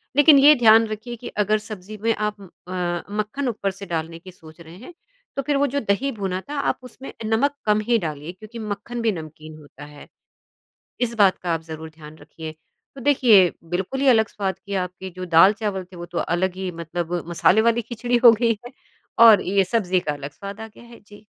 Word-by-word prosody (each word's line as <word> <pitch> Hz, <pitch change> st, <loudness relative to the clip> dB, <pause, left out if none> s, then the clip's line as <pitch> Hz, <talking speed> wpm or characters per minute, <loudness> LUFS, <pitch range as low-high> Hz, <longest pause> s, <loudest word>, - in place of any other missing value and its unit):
लेकिन 290 Hz, +1 st, +7 dB
ये 290 Hz, +2 st, +8 dB
ध्यान 225 Hz, 0 st, +7 dB
रखिए 215 Hz, +3 st, -6 dB
कि -, -, -7 dB, 0.2 s
अगर 215 Hz, +1 st, +1 dB
सब्ज़ी 215 Hz, 0 st, -9 dB
में 230 Hz, 0 st, +2 dB
आप 210 Hz, -1 st, -3 dB
अ, 180 Hz, 0 st, -5 dB
मक्खन 215 Hz, +6 st, -3 dB
ऊपर 200 Hz, -4 st, -2 dB
से 200 Hz, -, -7 dB
डालने 165 Hz, +1 st, -4 dB
की 185 Hz, +2 st, -13 dB
सोच 160 Hz, -2 st, -17 dB
रहे 165 Hz, 0 st, -13 dB
हैं, 255 Hz, -, -12 dB, 0.4 s
तो 275 Hz, -, -1 dB
फिर 290 Hz, -1 st, +2 dB
वो 285 Hz, -, +3 dB
जो 285 Hz, +2 st, -2 dB
दही 275 Hz, +7 st, -2 dB
भुना 190 Hz, -1 st, -2 dB
था, 295 Hz, -, -4 dB
आप -, -, -1 dB
उसमें 255 Hz, +2 st, -11 dB
नमक 245 Hz, +6 st, +1 dB
कम 210 Hz, 0 st, +3 dB
ही 235 Hz, -, +4 dB
डालिए 150 Hz, +2 st, -7 dB
क्योंकि 215 Hz, +5 st, -11 dB
मक्खन 220 Hz, +4 st, -5 dB
भी 230 Hz, -1 st, +2 dB
नमकीन 155 Hz, -3 st, -9 dB
होता 145 Hz, -1 st, -13 dB
है, 145 Hz, -, -13 dB, 0.9 s
इस 240 Hz, -1 st, -1 dB
बात 190 Hz, -2 st, +4 dB
का 170 Hz, -, +1 dB
आप 165 Hz, -, -2 dB
ज़रूर 160 Hz, 0 st, -7 dB
ध्यान 155 Hz, -1 st, -13 dB
रखिए। 160 Hz, +1 st, -9 dB, 0.4 s
तो 270 Hz, -, -10 dB
देखिए, 230 Hz, -9 st, +5 dB, 0.2 s
बिल्कुल 190 Hz, +9 st, -2 dB
ही 280 Hz, -, +2 dB
अलग 220 Hz, -4 st, +5 dB
स्वाद 195 Hz, -2 st, -4 dB
की 200 Hz, -, -6 dB
आपकी 180 Hz, +1 st, -8 dB
जो 185 Hz, -, -5 dB
दाल 190 Hz, +5 st, +8 dB
चावल 200 Hz, -3 st, -2 dB
थे, 185 Hz, +1 st, -16 dB
वो 175 Hz, -, -7 dB
तो 175 Hz, 0 st, -8 dB, 0.2 s
अलग 185 Hz, 0 st, -1 dB
ही 185 Hz, -, -3 dB
मतलब 170 Hz, +1 st, -4 dB, 0.2 s
मसाले 180 Hz, +5 st, +3 dB
वाली 235 Hz, +1 st, 0 dB
खिचड़ी 240 Hz, +1 st, 0 dB
हो 235 Hz, -, +11 dB
गई 235 Hz, -1 st, +3 dB
है, 245 Hz, -, -9 dB, 0.5 s
और 225 Hz, -4 st, +8 dB
ये 195 Hz, +1 st, +1 dB
सब्ज़ी 190 Hz, -3 st, 0 dB
का 150 Hz, -, +1 dB
अलग 145 Hz, 0 st, -8 dB
स्वाद 200 Hz, +6 st, -9 dB
आ 220 Hz, -, -7 dB
गया 220 Hz, -, -17 dB
है। 235 Hz, 0 st, -15 dB
जी। 205 Hz, +1 st, -16 dB
200 Hz, 215 wpm, -22 LUFS, 175-230 Hz, 0.9 s, हो